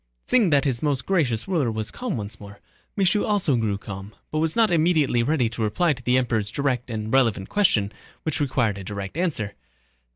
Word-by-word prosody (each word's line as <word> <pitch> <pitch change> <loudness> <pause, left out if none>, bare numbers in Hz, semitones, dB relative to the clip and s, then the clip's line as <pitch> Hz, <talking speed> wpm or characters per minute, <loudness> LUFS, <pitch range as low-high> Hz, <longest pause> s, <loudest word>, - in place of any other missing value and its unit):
Seeing 230 -7 +3
that 145 -2 +3
his 130 -4 +1
most 140 -4 0
gracious 135 - 0
ruler 160 -11 +1
was 110 -1 -4
calm 240 - -3
once 105 -1 -5
more, 100 0 -11 0.4
Michaud 200 +1 +2
also 195 -10 +2
grew 110 -4 0
calm, 100 0 -8 0.2
but 155 - -1
was 160 0 0
not 225 -3 +4
immediately 155 -7 +3
ready 130 -1 +1
to 115 0 -6
reply 150 +10 +2
to 130 - -11
the 125 +1 +2
Emperor's 115 -5 0
direct 125 0 -1
and 110 0 -4
relevant 115 -7 +2
question 110 - +2 0.3
which 155 -1 -1
required 125 -8 0
a - - -7
direct 100 +2 -6
answer. 145 - -1
125 Hz, 195 wpm, -24 LUFS, 110-160 Hz, 0.4 s, not